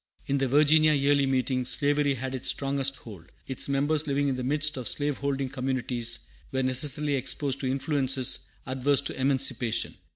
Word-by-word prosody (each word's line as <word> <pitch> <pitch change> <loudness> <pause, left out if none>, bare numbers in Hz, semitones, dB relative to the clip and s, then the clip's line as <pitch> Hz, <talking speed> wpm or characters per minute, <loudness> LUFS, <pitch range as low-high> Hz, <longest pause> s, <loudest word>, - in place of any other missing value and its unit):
In 140 0 0
the 135 - +1
Virginia 155 +3 +5
Yearly 140 -1 +2
Meeting 130 -1 0
slavery 145 +2 +1
had 130 +1 -5
its 130 0 0
strongest 140 -1 0
hold. 100 -10 -13
Its 130 +1 0
members, 145 +3 +1
living 140 0 +1
in 135 - -1
the 130 - -4
midst 150 +3 +2
of 125 -4 -5
slave 145 +2 -1
holding 140 -1 -1
communities, 125 -3 -2 0.3
were 130 -1 0
necessarily 140 +3 +1
exposed 135 +1 -1
to 135 - -2
influences 135 -1 0 0.3
adverse 135 +2 +1
to 135 - -5
emancipation. 130 -3 0
135 Hz, 165 wpm, -27 LUFS, 130-145 Hz, 0.3 s, Virginia